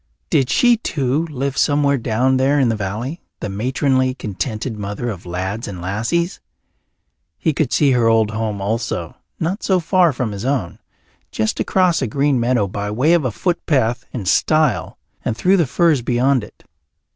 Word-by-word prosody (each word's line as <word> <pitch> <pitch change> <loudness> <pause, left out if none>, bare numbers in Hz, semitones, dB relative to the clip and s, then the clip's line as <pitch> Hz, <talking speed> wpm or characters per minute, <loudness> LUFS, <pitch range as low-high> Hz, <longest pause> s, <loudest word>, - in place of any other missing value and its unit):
Did 130 -2 +2
she 240 -1 +4
too 145 - -1
live 140 -2 -3
somewhere 145 -1 +2
down 125 +3 +1
there 135 +2 +2
in 130 -3 +3
the 115 - +1
valley, 110 - -4 0.2
the - - -4
matronly, 130 +4 0
contented 110 +1 -4
mother 105 +4 -4
of 95 -3 -9
lads 95 +6 -3
and 95 -3 -6
lassies? 115 - -1 1.0
He 160 - 0
could 140 -3 -1
see 145 -3 +3
her 120 -3 +3
old 110 -1 +3
home 110 -2 -3
also, 105 -5 -2 0.2
not 180 +7 -2
so 190 -2 +2
far 175 0 +3
from 125 -4 -3
his 100 0 -6
own, 130 -9 -2 0.5
just 110 0 -1
across 185 -3 +2
a 130 - 0
green 140 +3 +1
meadow 120 -3 +2
by 100 +2 -4
way 130 +11 +2
of 170 -5 +2
a 125 - 0
footpath 130 - 0
and 105 -8 -5
stile 155 - +2 0.3
and 110 - -2
through 185 - +3
the 170 -6 +2
firs 155 0 +2
beyond 125 +1 +1
it. 105 - -14
125 Hz, 170 wpm, -19 LUFS, 110-145 Hz, 1.0 s, she